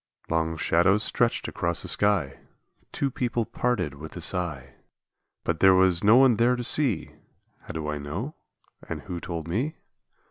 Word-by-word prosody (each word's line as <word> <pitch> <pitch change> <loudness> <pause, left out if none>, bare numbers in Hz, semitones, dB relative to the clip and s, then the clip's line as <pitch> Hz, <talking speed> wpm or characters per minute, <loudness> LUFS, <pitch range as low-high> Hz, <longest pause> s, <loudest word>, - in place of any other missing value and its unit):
Long 80 0 0
shadows 95 +6 +2
stretched 120 -1 0
across 85 -1 -1
the - - -6
sky, 95 -10 +1 0.5
Two 140 -1 -2
people 120 -2 -1
parted 115 - -1
with 75 +2 -10
a - - -5
sigh, 75 -7 -3 0.7
But 85 -1 -2
there 95 -1 +6
was 95 -1 +3
no 105 +3 +6
one 130 -3 +5
there 120 +2 +3
to 120 - -4
see! 120 - +3 0.5
How - - -24
do 80 -2 -4
I 75 -1 -3
know? 90 - -5 0.6
and - - -4
who 90 -2 -6
told 85 -2 -6
me? 125 - -2
95 Hz, 165 wpm, -26 LUFS, 80-120 Hz, 0.7 s, there